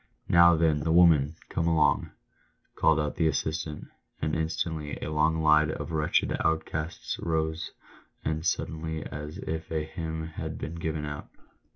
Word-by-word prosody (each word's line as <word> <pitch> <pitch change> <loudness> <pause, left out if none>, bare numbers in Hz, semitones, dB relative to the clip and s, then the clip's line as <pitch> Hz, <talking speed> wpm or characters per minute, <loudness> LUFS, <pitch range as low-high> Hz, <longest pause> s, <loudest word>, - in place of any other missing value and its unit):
" - - -48
Now 85 0 +7
then, 80 -2 +3
the 80 +2 -1
women, 80 -3 +5
come 85 0 -1
along 80 -2 +3 0.3
!" - - -41
called 80 -1 +3
out 75 -1 -2
the 80 - +3
assistant 80 -1 -2 0.3
And 75 0 -1
instantly 80 -1 -2
the 75 - -4
long 80 +1 +2
line 75 0 +5
of 80 - -4
wretched 75 -1 +1
outcasts 80 0 -2
rose 80 0 -1 0.6
as 80 +1 -1
suddenly 80 -1 -2
as 75 +3 -6
if 80 0 -5
a 80 -1 0
hymn 80 0 -5
had 80 - -5
been 75 - -5
given 80 -2 -3
out. 75 -1 -6
80 Hz, 160 wpm, -28 LUFS, 75-80 Hz, 0.6 s, Now